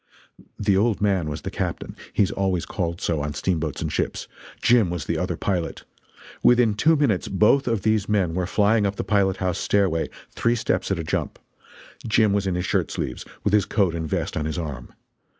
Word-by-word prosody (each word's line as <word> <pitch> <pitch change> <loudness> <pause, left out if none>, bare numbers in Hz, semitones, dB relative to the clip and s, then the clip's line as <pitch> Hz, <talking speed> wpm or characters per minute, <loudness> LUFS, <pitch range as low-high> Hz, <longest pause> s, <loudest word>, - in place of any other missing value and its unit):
The 100 -2 +2
"old 105 +2 +2
man" 95 -6 +1
was 75 - -5
the - - -4
captain - - -4 0.2
he - - +3
is 95 - -1
always 95 -3 -1
called 85 -2 -3
so, 80 -3 -1
on 75 -1 -4
steamboats 80 -2 -1
and - - -3
ships; - - -2 0.3
"Jim" 115 -6 +4
was 85 -4 -4
the - - -1
other - - -2
pilot. 90 -4 -2 0.6
Within 120 -3 +5
two 155 +10 +3
minutes 140 -11 +1
both 110 +8 +3
of 115 -5 0
these 110 -2 +1
men 95 -6 +1
were 90 0 -1
flying 105 +1 +3
up 100 - -3
the - - -3
pilothouse 95 -3 +1
stairway, 95 -5 +1 0.2
three 115 +1 +1
steps 95 -5 -1
at 100 - 0
a 85 - -3
jump. 80 - -2 0.7
Jim 110 -1 +3
was 100 -1 0
in 90 - 0
his 90 +1 -2
shirt - - 0
sleeves, 65 - -4 0.2
with 100 - 0
his 105 -2 +4
coat 100 -6 +1
and 80 -2 -4
vest - - -2
on 75 - -1
his 80 +1 -3
arm. 75 -8 -5
95 Hz, 205 wpm, -24 LUFS, 85-105 Hz, 0.7 s, Within